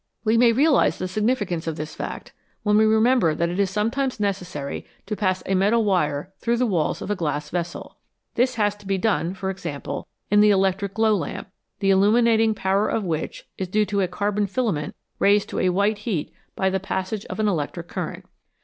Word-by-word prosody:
We 220 Hz, 0 st, +2 dB
may 235 Hz, 0 st, +6 dB
realise 280 Hz, +5 st, +3 dB
the 185 Hz, -, -3 dB
significance 205 Hz, -4 st, -1 dB
of 160 Hz, -, -2 dB
this 155 Hz, 0 st, -6 dB
fact -, -, -6 dB, 0.3 s
when 210 Hz, -1 st, +3 dB
we 215 Hz, +1 st, +5 dB
remember 220 Hz, -6 st, +3 dB
that 170 Hz, 0 st, 0 dB
it 175 Hz, +3 st, -3 dB
is 200 Hz, -2 st, +2 dB
sometimes 230 Hz, +6 st, -1 dB
necessary 180 Hz, -8 st, -3 dB, 0.2 s
to 210 Hz, -, -3 dB
pass 185 Hz, -3 st, 0 dB
a 195 Hz, -, -1 dB
metal 210 Hz, +4 st, +3 dB
wire 175 Hz, -2 st, 0 dB
through 235 Hz, 0 st, 0 dB
the 250 Hz, -, +2 dB
walls 175 Hz, -9 st, 0 dB
of -, -, -4 dB
a -, -, +1 dB
glass 150 Hz, -4 st, -3 dB
vessel. 170 Hz, -1 st, -4 dB, 0.4 s
This 255 Hz, +1 st, +1 dB
has 205 Hz, -2 st, +2 dB
to 205 Hz, -1 st, -14 dB
be 195 Hz, 0 st, +1 dB
done, 190 Hz, -3 st, 0 dB
for 190 Hz, 0 st, -3 dB
example, 165 Hz, -7 st, -5 dB, 0.2 s
in 205 Hz, -, +5 dB
the 210 Hz, -, +6 dB
electric 195 Hz, 0 st, +1 dB
glow 220 Hz, -1 st, +3 dB
lamp, -, -, -4 dB, 0.3 s
the 195 Hz, -1 st, +3 dB
illuminating 220 Hz, +3 st, +4 dB
power 195 Hz, +1 st, +1 dB
of 220 Hz, -, -1 dB
which 160 Hz, -4 st, -3 dB
is 190 Hz, -, -2 dB
due 210 Hz, +4 st, +2 dB
to 200 Hz, -1 st, 0 dB
a 185 Hz, -, +1 dB
carbon 205 Hz, +3 st, -1 dB
filament 195 Hz, -, -2 dB, 0.2 s
raised 200 Hz, +1 st, +3 dB
to -, -, -3 dB
a 185 Hz, -, +2 dB
white 200 Hz, +3 st, +1 dB
heat 200 Hz, -8 st, -3 dB, 0.2 s
by 190 Hz, 0 st, +1 dB
the 190 Hz, -, 0 dB
passage 190 Hz, +2 st, -3 dB
of -, -, -7 dB
an 215 Hz, -, +2 dB
electric 170 Hz, -1 st, -2 dB
current. -, -, -5 dB
200 Hz, 205 wpm, -23 LUFS, 180-215 Hz, 0.4 s, may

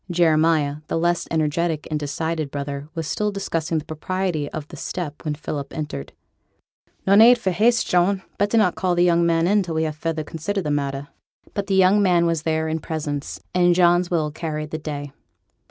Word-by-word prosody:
Jeremiah, 160 Hz, -4 st, +3 dB
the -, -, -1 dB
less 175 Hz, +1 st, +1 dB
energetic 160 Hz, 0 st, 0 dB
and 155 Hz, -, 0 dB
decided 155 Hz, +1 st, -2 dB
brother, 140 Hz, +1 st, -5 dB
was 165 Hz, -1 st, -3 dB
still 210 Hz, +7 st, -1 dB
discussing 165 Hz, -5 st, -2 dB
the 155 Hz, -, -4 dB
propriety 160 Hz, -1 st, -2 dB
of 155 Hz, -2 st, -6 dB
the -, -, -9 dB
step 155 Hz, -5 st, -5 dB
when 150 Hz, -2 st, -2 dB
Philip 145 Hz, -2 st, -5 dB
entered. 145 Hz, -, -5 dB, 0.9 s
'No 195 Hz, -, +4 dB
need 230 Hz, +4 st, +8 dB
for 195 Hz, -5 st, -1 dB
haste, 230 Hz, +6 st, +3 dB
John; 185 Hz, +2 st, +2 dB, 0.2 s
better 205 Hz, +3 st, +2 dB
not 205 Hz, -5 st, +4 dB
call 180 Hz, -1 st, 0 dB
the 175 Hz, -, +3 dB
young 170 Hz, -1 st, +3 dB
man 170 Hz, +5 st, +3 dB
till 170 Hz, -4 st, -4 dB
we 160 Hz, -, +1 dB
have 155 Hz, -1 st, -2 dB
further 160 Hz, 0 st, -2 dB
considered 170 Hz, +6 st, -3 dB
the 150 Hz, -, -2 dB
matter.' 140 Hz, -1 st, -2 dB, 0.4 s
But 200 Hz, -2 st, -3 dB
the 195 Hz, -, +1 dB
young 190 Hz, +2 st, +5 dB
man 175 Hz, -3 st, +3 dB
was 165 Hz, -2 st, 0 dB
there 160 Hz, 0 st, 0 dB
in 160 Hz, +1 st, -1 dB
presence; 150 Hz, -3 st, -4 dB
and 175 Hz, -1 st, +4 dB
John's 175 Hz, 0 st, +4 dB
will 155 Hz, -4 st, 0 dB
carried 155 Hz, -1 st, -4 dB
the 155 Hz, -, -3 dB
day. 145 Hz, -2 st, -5 dB
165 Hz, 190 wpm, -22 LUFS, 150-180 Hz, 0.9 s, need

